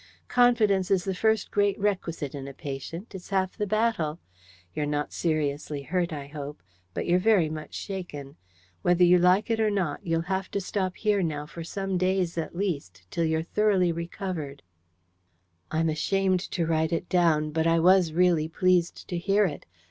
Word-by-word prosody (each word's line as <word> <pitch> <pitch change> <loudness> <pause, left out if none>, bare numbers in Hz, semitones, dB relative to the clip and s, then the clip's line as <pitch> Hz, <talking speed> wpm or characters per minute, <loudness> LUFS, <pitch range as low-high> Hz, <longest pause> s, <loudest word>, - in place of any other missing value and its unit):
"Confidence 220 -6 +3
is 190 -3 +2
the 190 - -2
first 220 +2 +1
great 205 0 +1
requisite 175 -8 -2
in 140 -2 -6
a 135 - -9
patient: 145 - -7
it's 185 -2 -9
half 190 -2 0
the 210 -2 -2
battle. 215 -8 0 0.6
You're 150 - -2
not 145 0 -2
seriously 150 -2 -1
hurt, 175 +3 -1
I 145 -3 -5
hope, 145 - -8 0.3
but - - -2
you're 175 +1 +3
very 185 -6 +3
much 155 -1 -7
shaken. 160 -8 -6 0.5
Whether 175 0 +3
you 180 0 +6
like 185 +5 +3
it 225 - +1
or 220 -1 +3
not, 185 -8 -1
you'll 165 -3 0
have 190 +1 -2
to 200 - -2
stop 185 -1 -2
here 210 -2 +1
now 150 -4 -2
for 165 +2 -8
some 195 +2 -3
days 185 -2 +1
at 165 0 -4
least, 140 - -3
till 170 - 0
you're 160 0 0
thoroughly 195 -1 +2
recovered." 170 -4 -5 1.1
I'm 160 +1 +1
ashamed 185 +4 +1
to 170 -3 -1
write 160 -1 +1
it 170 +1 -1
down; 160 -4 +2
but 160 +1 +1
I 165 0 +4
was 180 0 +5
really 170 -2 +3
pleased 175 +1 +1
to 175 - -2
hear 200 +4 +3
it. 150 -6 -5
175 Hz, 180 wpm, -27 LUFS, 155-195 Hz, 1.1 s, you